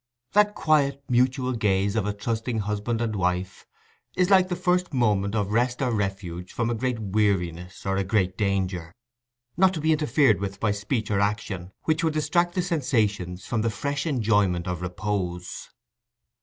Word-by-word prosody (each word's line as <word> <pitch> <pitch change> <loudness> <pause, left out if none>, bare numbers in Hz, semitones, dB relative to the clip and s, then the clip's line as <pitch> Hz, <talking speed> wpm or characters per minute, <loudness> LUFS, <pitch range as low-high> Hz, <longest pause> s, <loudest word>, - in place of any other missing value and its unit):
That 210 0 +4
quiet 140 -3 +2
mutual 130 +1 +2
gaze 100 -3 +1
of 105 -3 0
a 105 - -1
trusting 110 +2 -2
husband 105 +3 -2
and 110 -2 -1
wife 90 0 -2 0.5
is 180 +1 +2
like 185 -1 +6
the 180 - -1
first 180 -3 0
moment 105 -4 +1
of 105 -2 0
rest 120 +2 +1
or 130 -3 0
refuge 95 -4 -3
from 120 0 0
a - - +1
great 125 +1 -1
weariness 95 -4 -1
or 95 0 0
a 100 - +1
great 95 -2 +1
danger—not 120 - -2
to - - -3
be 155 +1 +2
interfered 150 -7 +3
with 100 0 -4
by 110 - +1
speech 105 +2 -2
or 100 - +2
action 100 -3 -2
which 160 +1 +1
would 160 -1 +1
distract 170 +3 +1
the 180 - +1
sensations 110 - -1
from 120 -2 -1
the 115 - +1
fresh 140 +6 -3
enjoyment 105 - +1
of 90 -1 -3
repose. 90 -1 -4
110 Hz, 170 wpm, -25 LUFS, 95-135 Hz, 0.5 s, like